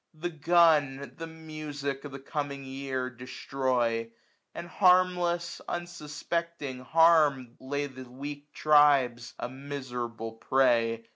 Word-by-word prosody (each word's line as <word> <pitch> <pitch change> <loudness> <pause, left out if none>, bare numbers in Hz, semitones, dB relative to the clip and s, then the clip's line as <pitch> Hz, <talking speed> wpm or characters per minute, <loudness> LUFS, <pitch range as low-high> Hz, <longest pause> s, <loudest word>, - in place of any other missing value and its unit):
The 175 +3 -4
gun 150 -5 +3
the 165 - -6
music 150 -3 -6
of 145 - -7
the 135 - -6
coming 140 0 -4
year 135 -1 -3
Destroy; 125 -2 -1 0.5
and 170 - -6
harmless, 180 -2 +2
unsuspecting 170 -4 -4
harm^ 155 -5 +4
Lay 145 +2 -2
the 130 -2 -10
weak 145 +3 -8
tribes, 140 -6 +3
a - - -4
miserable 125 -4 -5
prey. 115 -1 +1
140 Hz, 110 wpm, -29 LUFS, 130-160 Hz, 0.5 s, harm^